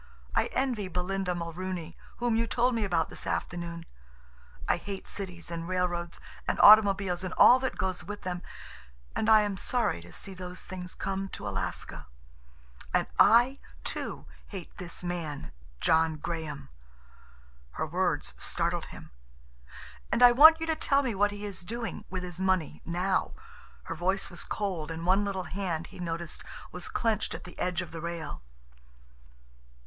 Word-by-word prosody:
I - - +3
envy 250 -7 -1
Belinda 180 +1 -1
Mulrooney, 170 0 -4 0.2
whom 240 -1 +1
you 230 +1 +1
told 245 +2 +2
me 225 -2 0
about 170 -5 +1
this - - -5
afternoon. 170 -1 -3 0.8
I - - +3
hate 200 -1 -6
cities 180 -4 -5
and 165 0 -4
railroads 175 -2 -1 0.3
and - - 0
automobiles, 195 -4 +7
and 185 - -4
all 250 - +8
that 260 0 -2
goes 185 -1 -1
with 205 0 -7
them, 180 -1 -3 0.7
and 220 - +1
I 220 -1 +8
am 205 -2 -1
sorry 235 - 0
to 85 +1 -13
see 195 - -6
those 180 0 -7
things 180 -1 -7
come 195 0 -3
to - - -6
Alaska. - - -4 0.8
And - - +2
I, 245 +5 +6 0.2
too, - - -4 0.2
hate 190 -5 -8
this 180 -1 -2
man—John 155 - -1
Graham!" 155 -2 -5 1.0
Her - - -2
words - - 0
startled - - 0
him. - - -12 1.0
"And 245 - +4
I 245 - +10
want 315 +6 +9
you 325 - -2
to 320 -1 +1
tell 285 -2 +2
me 245 -4 -1
what 205 +1 +3
he 205 0 -6
is 195 -2 -5
doing—with 195 -3 -5
his 180 0 -5
money—now." 185 0 0 0.5
Her - - -5
voice 190 +4 0
was 175 - -2
cold, 185 -7 -3
and 165 +1 -5
one 190 +3 +4
little 195 -2 -2
hand, 180 -4 -3
he - - -11
noticed, 170 -1 -4 0.3
was 180 -1 -5
clenched 225 -2 0
at - - -8
the 180 - -12
edge 180 0 0
of 180 - -11
the 165 - -6
rail. 170 -1 -5
185 Hz, 155 wpm, -29 LUFS, 170-205 Hz, 1.0 s, I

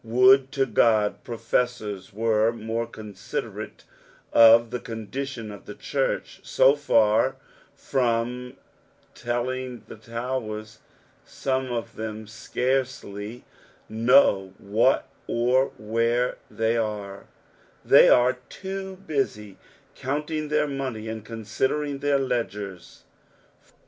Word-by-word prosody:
Would 130 +3 +5
to 135 -1 +2
Qod 110 -3 +3
profeasora 115 -3 -2
were 110 +1 +2
mora 115 0 -3
considerate 105 -3 -7 0.5
of 115 0 +7
the 125 - -2
condition 115 +1 -6
of 100 -2 -12
the - - -7
church; - - -2
so 135 +2 +4
far 110 -7 +3 0.4
from 125 0 -1 0.6
telling 120 0 -3
the - - -9
towers, 110 -2 -5 0.4
some 130 -1 -2
of 115 -1 -4
them 110 0 -5
scarcely 120 -1 -3 0.4
know 110 -5 +3
what 110 +6 +2 0.2
or 125 +3 +2
where 115 +3 0
thej 115 0 +1
are; 100 -2 -6 0.6
they - - +7
are 125 +1 +4
too 190 0 -6
busy 105 - -2 0.4
countiCK 150 +3 -3
their 150 0 +2
money, 130 -6 -4
and 110 -1 -5
considering 130 +6 -2
their 145 0 +2
ledgers. 105 -8 -4
115 Hz, 100 wpm, -25 LUFS, 110-130 Hz, 0.6 s, of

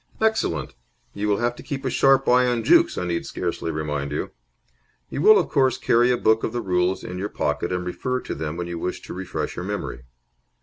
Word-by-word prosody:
"Excellent. 220 - 0 0.4
You 105 - -2
will 100 -1 +2
have 120 +1 0
to - - -9
keep 135 -1 -5
a 130 - 0
sharp 135 0 +4
eye 125 0 +5
on 120 -2 0
Jukes, - - +4
I 90 - -1
need 85 -1 -1
scarcely - - -3
remind 75 -3 -3
you. 75 - -3 0.8
You 140 - -3
will, 215 +5 +8
of - - 0
course, 130 -3 +2
carry 120 +1 +3
a 125 - +3
book 110 -1 +2
of 110 - -2
the 120 - -1
rules 90 -2 0
in 90 0 -6
your 100 +2 -3
pocket - - -2
and 90 0 -2
refer 125 +8 -2
to - - -5
them 80 +1 -4
when 90 - -3
you 85 -1 -5
wish 90 - -3
to - - -8
refresh 90 0 -4
your 90 - -5
memory. 100 -10 -5
100 Hz, 225 wpm, -23 LUFS, 90-125 Hz, 0.8 s, will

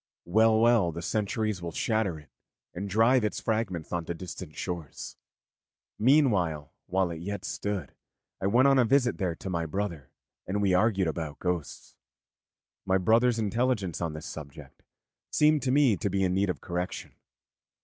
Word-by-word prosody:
Well, 110 +4 +4
well, 115 -6 +4
the 85 +2 -6
centuries 105 -1 -1
will 85 -1 -4
shatter 110 -7 0
it 75 - -16 0.4
and 100 +3 -5
drive 115 +5 +4
its 105 - -1
fragments 110 -8 -2
on 85 -1 -1
to 85 - -4
distant 90 -2 -8
shores. 85 -6 -6 0.8
Meanwhile, 105 - +2
while 95 -1 +1
it 80 -1 -6
yet 100 +1 -5
stood, 100 0 -4 0.5
I 95 - +1
went 125 +7 +5
on 135 -1 +5
a - - +6
visit 125 0 +2
there 90 -4 -1
to 95 - -7
my 85 -2 -1
brother, 85 -5 -4 0.4
and 100 +2 -1
we 100 -2 +2
argued 95 -1 +3
about 80 -2 -4
ghosts. 90 -4 -4 0.9
My 95 -1 +2
brother's 115 +5 +3
intelligence 110 -5 0
on 85 -2 -2
this 75 0 -8
subject 70 -3 -10 0.5
seemed 150 -1 +3
to 130 - 0
me 135 -5 +4
to 100 - -1
be 95 0 0
in 90 -1 +1
need 95 +1 +1
of 80 -8 -3
correction. 90 0 -4
95 Hz, 165 wpm, -28 LUFS, 85-110 Hz, 0.9 s, a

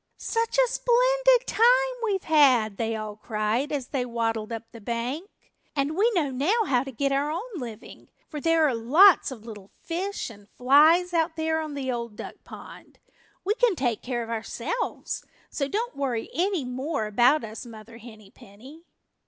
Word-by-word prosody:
"Such 460 +1 -2
a - - +5
splendid - - +3
time - - -4 0.4
we've 400 -4 -1
had," 255 -10 +4
they 225 -1 -1
all 215 -1 -6
cried 215 +5 -2
as 275 -4 -3
they 265 -3 -1
waddled 230 -2 -2
up 225 -1 -4
the 230 - -12
bank. 245 - -4 0.5
"And 285 +2 -1
we 425 +6 +3
know 300 -6 +1
now 345 - +1
how 250 -6 +1
to 270 - -8
get 275 +3 -1
our 280 +2 0
own 335 +6 -3 0.2
living, 230 -4 -10 0.2
for 300 - -7
there 330 -1 +3
are 270 - 0
lots 300 - +5
of 230 -5 -10
little 205 -4 -10
fish 370 -4 -4
and 205 -1 -17
flies 315 +8 +4
out 325 -1 +1
there 320 0 -1
on 305 -2 -6
the 265 -2 -3
Old 235 -3 -5
Duck - - -8
Pond. - - -13 0.5
We 410 - +2
can 485 -3 +2
take 240 -7 -1
care 240 -2 -3
of 230 - -8
ourselves, 235 - -4 0.3
so 275 - -2
don't 460 - -3
worry 250 -5 -3
any 360 -4 0
more 260 0 -3
about 240 +8 +3
us, 220 0 -7
Mother 230 0 -12
Henny 220 -4 -14
Penny." 260 +12 -15
275 Hz, 175 wpm, -26 LUFS, 230-335 Hz, 0.5 s, a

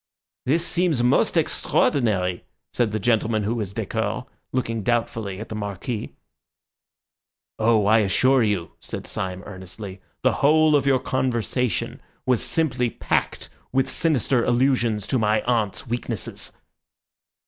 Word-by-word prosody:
"This 165 +5 +2
seems 170 -9 +1
most 125 - +3
extraordinary," 95 -9 +1 0.3
said 120 -3 +1
the 110 - -1
gentleman 110 0 +1
who 105 +3 0
was 105 -5 -3
décoré, - - -2 0.3
looking 115 -3 -1
doubtfully 115 -4 -1
at 110 - -7
the - - -5
Marquis. 105 +2 -4 1.4
"Oh, 110 -2 +3
I 110 +2 +5
assure 130 +6 +3
you," 100 -7 0
said - - -7
Syme 95 0 -3
earnestly, 95 0 -9 0.2
"the - - +5
whole 155 +1 +5
of 140 -1 +2
your 135 -1 +5
conversation 125 -3 -1 0.2
was 125 -3 +2
simply 130 -7 +1
packed - - -1 0.2
with 135 0 +1
sinister 135 -6 +2
allusions 120 -4 +2
to 130 +4 0
my 110 0 +2
aunt's 115 -4 0
weaknesses." 120 -3 -4
115 Hz, 125 wpm, -24 LUFS, 105-130 Hz, 1.4 s, I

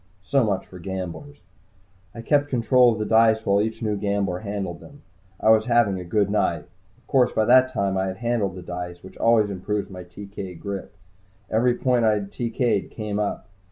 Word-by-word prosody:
So 140 +4 +2
much 100 -4 -1
for 90 - -12
gamblers. 95 - -7 0.7
I 115 - -7
kept 145 +3 +2
control 125 0 +4
of 110 - -2
the 110 - -2
dice 110 0 +4
while 100 +1 +3
each 110 +2 -3
new 105 -1 0
gambler 100 -3 -1
handled 100 -5 -4
them. 145 0 -15 0.4
I 110 - +4
was 110 0 +4
having 115 -5 +2
a - - -6
good 100 +3 +1
night. 85 -7 0 0.3
Of 125 - -30
course, 130 -2 +2
by 110 - +2
that 130 +2 +5
time 100 -5 -1
I 95 0 0
had 95 0 -5
handled 115 -5 -1
the 90 - -8
dice, 90 0 -6
which 95 - -12
always 115 -3 +3
improves 100 +2 -3
my 90 -1 -8
TK 95 0 -9
grip. 100 -1 -6 0.6
Every 120 +2 +2
point 125 -2 +1
I 110 -1 +4
had 100 -1 -3
TK'd 120 -3 -1
came 105 -2 -4
up. 105 -3 -3
105 Hz, 195 wpm, -24 LUFS, 95-115 Hz, 0.7 s, that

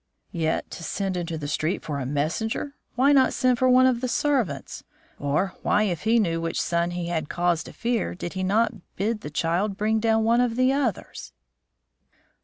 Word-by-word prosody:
"Yet 165 -3 -1
to 170 - -8
send 195 +3 -2
into 170 -2 -3
the 145 -2 -5
street 155 +4 -1
for 145 -2 -3
a 130 - -3
messenger! 170 - -2 0.2
Why 265 +4 +4
not 270 -2 +4
send 255 -2 +2
for 255 - +4
one 255 +1 +6
of 250 -2 +2
the 255 - -1
servants? 240 - -1 0.4
Or 150 +7 0
why, 210 - +2
if 185 -1 -2
he 225 +2 +4
knew 165 -7 +1
which 165 0 -2
son 170 0 0
he 175 -1 -4
had 160 -4 -2
cause 175 -1 +1
to - - -9
fear, 235 -6 -2
did 175 -1 -6
he 190 - -3
not 215 +6 +2 0.2
bid 210 +3 -1
the 150 - -6
child 175 +6 -1
bring 220 +1 +1
down 225 0 +2
one 230 +2 +3
of 240 -2 0
the 255 +2 +3
others?" 265 -8 -3
200 Hz, 200 wpm, -25 LUFS, 165-235 Hz, 0.4 s, one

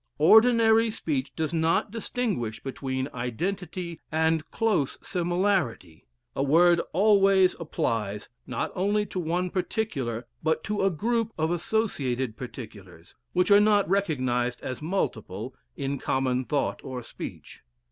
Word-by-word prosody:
Ordinary 225 +5 +6
speech 150 -10 -2
does 160 0 -2
not 165 +4 +1
distinguish 210 - -2
between 130 -1 -3
identity 170 - -4
and 160 0 +1
close 210 -12 0
similarity. 175 - -1 0.3
A - - -1
word 170 +5 +5
always 195 -1 +4
applies, 110 -10 -2 0.2
not 125 - -2
only 205 +3 +1
to 185 - -5
one 175 +2 -1
particular, 140 - -2 0.2
but 160 0 0
to 210 0 -2
a 195 - +4
group 225 +6 -1
of 160 +1 0
associated 140 - -1
particulars, 105 -9 -10 0.2
which 180 +3 +2
are 200 - +9
not 210 -1 +4
recognized 130 -10 0
as 130 - -5
multiple 120 - -3 0.2
in 140 0 -2
common 130 -1 0
thought 145 0 -1
or 125 -2 -6
speech. - - -9
160 Hz, 125 wpm, -27 LUFS, 130-195 Hz, 0.3 s, are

